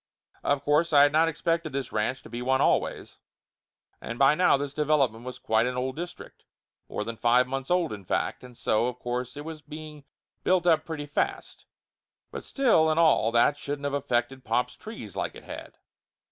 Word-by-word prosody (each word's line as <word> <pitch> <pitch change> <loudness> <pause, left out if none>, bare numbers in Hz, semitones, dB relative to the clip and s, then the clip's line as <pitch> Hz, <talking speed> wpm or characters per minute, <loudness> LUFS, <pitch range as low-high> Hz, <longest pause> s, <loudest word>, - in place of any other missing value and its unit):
Of 140 -1 0
course 155 +3 +2
I 145 -1 +8
had 145 - +4
not 160 +2 +4
expected 165 -1 -1
this 135 -2 -3
ranch 110 +5 -1
to - - -12
be 120 - -4
one 130 +1 +2
always, - - 0 0.8
and 115 - -6
by 135 +2 +6
now 165 -2 +4
this 140 0 -4
development 140 -7 +1
was 130 - -6
quite 110 +2 +1
an 125 0 -3
old 130 +1 -2
district 175 +2 -8 0.5
more - - -3
than 115 +1 -5
five 120 +3 +3
months 135 0 -4
old, 175 -7 +1
in 100 -2 -8
fact, 90 - -2
and 125 -2 -13
so 110 +3 +1
of 125 -1 -4
course 125 +1 -4
it 145 - -7
was 160 -1 -7
being 150 0 -10 0.4
built 180 -1 +2
up 160 -2 +3
pretty 160 -3 -5
fast, 145 - -3 0.6
but - - -6
still 230 - +3
and 155 +1 +2
all 155 -8 +4
that 120 +5 +3
shouldn't 145 0 -5
of 140 - -1
affected 130 -2 -1
pop's 125 +2 0
trees 210 - -9
like - - -3
it - - -11
had. - - -9
140 Hz, 195 wpm, -27 LUFS, 125-155 Hz, 0.8 s, I